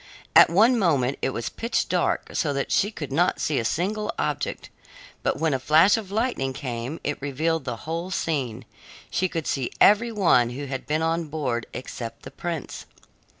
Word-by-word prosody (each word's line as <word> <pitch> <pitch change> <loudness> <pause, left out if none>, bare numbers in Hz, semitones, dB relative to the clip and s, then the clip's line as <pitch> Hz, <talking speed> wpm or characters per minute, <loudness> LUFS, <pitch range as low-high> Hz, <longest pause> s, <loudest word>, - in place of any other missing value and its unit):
At - - +9
one 225 +8 +4
moment 140 - +1
it - - +1
was 120 -3 -3
pitch 230 +1 -1
dark - - 0
so 145 -4 0
that 140 0 -2
she 200 - +3
could 150 -10 -7
not 175 +6 +2
see 150 - 0
a - - -1
single 210 - -1
object, - - -3 0.5
but - - 0
when 160 -2 +1
a 135 - 0
flash 160 +8 +5
of 220 -4 -5
lightning 210 - -1
came 125 +1 -5
it 145 -1 -3
revealed 155 +3 -1
the 125 - -3
whole 165 +3 -3
scene; 140 -11 -2 0.5
she 185 0 +1
could 165 -3 -3
see 130 -3 -1
every 225 +3 +5
one 170 - +3
who 135 +4 -5
had 135 -1 -5
been 155 +2 0
on 165 +1 0
board 140 -6 -3
except 115 -2 -7
the - - -9
prince. 170 -5 -5
155 Hz, 185 wpm, -25 LUFS, 135-180 Hz, 0.5 s, At